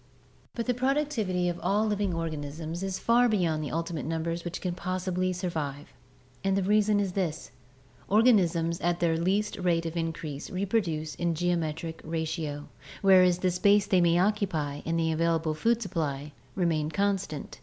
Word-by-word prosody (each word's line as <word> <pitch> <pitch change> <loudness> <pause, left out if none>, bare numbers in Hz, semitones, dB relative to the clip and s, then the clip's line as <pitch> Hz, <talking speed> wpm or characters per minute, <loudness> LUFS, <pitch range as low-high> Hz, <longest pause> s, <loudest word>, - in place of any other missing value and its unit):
But 235 - -2
the 250 - +1
productivity 245 -9 0
of 175 -1 -2
all 210 +2 +1
living 205 -2 0
organisms 160 0 -4
is 190 -1 -2
far 240 +1 +3
beyond 170 -7 +1
the 150 - -4
ultimate 165 -3 -3
numbers 165 +1 -2
which 175 0 -4
can 180 -2 -2
possibly 185 0 -2
survive, 160 -6 -4 0.5
and 195 0 +1
the 195 - +1
reason 210 +1 +3
is 195 -2 0
this: 180 -5 -3 0.6
organisms 180 -7 +3
at 175 0 0
their 170 -1 +2
least 195 +5 0
rate 170 -2 +1
of 165 0 -4
increase 160 -3 -4
reproduce 185 -5 -1
in 170 -1 -1
geometric 165 -1 -2
ratio, 160 -2 -3 0.4
whereas 185 -2 +6
the 185 0 +1
space 200 +3 +4
they 185 -3 +3
may 170 0 +4
occupy 175 -7 0
and 165 0 0
the 160 0 +1
available 165 0 +1
food 230 +9 +1
supply 150 -6 -3 0.2
remain 160 -5 +1
constant. 195 -5 -2
175 Hz, 155 wpm, -28 LUFS, 160-195 Hz, 0.6 s, whereas